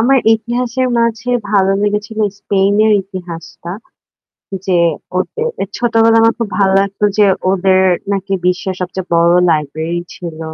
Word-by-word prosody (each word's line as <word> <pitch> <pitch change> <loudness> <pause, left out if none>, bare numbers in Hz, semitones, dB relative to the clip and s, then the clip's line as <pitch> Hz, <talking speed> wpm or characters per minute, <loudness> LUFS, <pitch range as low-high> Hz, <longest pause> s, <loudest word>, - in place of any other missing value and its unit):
আমার 265 +4 +4 0.2
ইতিহাসের 240 +3 -2
মাঝে 230 +1 -1 0.2
ভালো 195 -2 +3
লেগেছিল 210 +1 -2 0.2
স্পেনের 205 +2 +2
ইতিহাসটা। 175 -3 -9 1.0
যে 185 -2 +2 0.4
ওদের 460 - -2 0.2
এ - - +1
ছোটবেলায় 225 -1 +3
আমার 225 0 +4
খুব 230 -3 -2
ভালো 195 -1 +3
লাগতো 200 +1 -2
যে 210 - +6 0.3
ওদের 190 0 +3 0.3
নাকি 195 0 -3
বিশ্বের 180 +1 0
সবচেয়ে 185 0 -4
বড় 170 0 +4 0.2
লাইব্রেরি 160 +2 -2
ছিল। 170 -3 -8
195 Hz, 130 wpm, -15 LUFS, 180-225 Hz, 1.0 s, যে